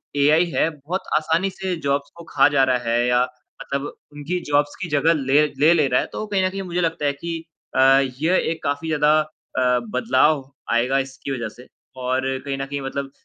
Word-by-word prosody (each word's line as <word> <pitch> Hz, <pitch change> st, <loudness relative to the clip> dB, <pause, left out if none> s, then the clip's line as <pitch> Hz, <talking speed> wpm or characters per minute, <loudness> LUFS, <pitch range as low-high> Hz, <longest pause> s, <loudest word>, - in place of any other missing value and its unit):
AI 150 Hz, +4 st, +4 dB
है, 160 Hz, -, +2 dB
बहुत 155 Hz, +5 st, -5 dB, 0.2 s
आसानी 165 Hz, +5 st, +1 dB
से 190 Hz, -1 st, -4 dB
जॉब्स 140 Hz, 0 st, 0 dB
को 170 Hz, -, -11 dB
खा 135 Hz, -, +5 dB
जा 135 Hz, -, +5 dB
रहा 125 Hz, -, +3 dB
है 120 Hz, +1 st, +2 dB
या 125 Hz, 0 st, +3 dB, 0.4 s
मतलब 140 Hz, 0 st, -3 dB, 0.3 s
उनकी 155 Hz, +5 st, -3 dB
जॉब्स 145 Hz, 0 st, +1 dB
की 175 Hz, -, -2 dB
जगह 150 Hz, +3 st, +3 dB
ले 150 Hz, +3 st, +3 dB
ले 150 Hz, -5 st, +3 dB
रहा 125 Hz, -, +2 dB
है। -, -, -5 dB
तो 215 Hz, -, -4 dB
कहीं 195 Hz, -2 st, 0 dB
न -, -, +1 dB
कहीं 195 Hz, +1 st, -5 dB
मुझे 180 Hz, -1 st, -2 dB
लगता 165 Hz, -3 st, -1 dB
है 140 Hz, -, +2 dB
कि 165 Hz, +4 st, -5 dB, 0.4 s
अ, -, -, +2 dB, 0.4 s
ये 175 Hz, +4 st, +2 dB
एक 165 Hz, -, -6 dB
काफ़ी 145 Hz, +3 st, -2 dB
ज़्यादा 150 Hz, 0 st, +3 dB
अ, 130 Hz, -5 st, -1 dB
बदलाव 130 Hz, +3 st, +2 dB, 0.2 s
आएगा 125 Hz, +4 st, +2 dB
इसकी 135 Hz, +1 st, -5 dB
वज़ह 115 Hz, -4 st, -3 dB
से 125 Hz, -, -14 dB, 0.3 s
और 130 Hz, +1 st, 0 dB, 0.2 s
कहीं 135 Hz, -1 st, -3 dB
न 135 Hz, -, -3 dB
कहीं 140 Hz, 0 st, -5 dB
मतलब 135 Hz, 0 st, -4 dB
145 Hz, 205 wpm, -22 LUFS, 135-165 Hz, 0.4 s, खा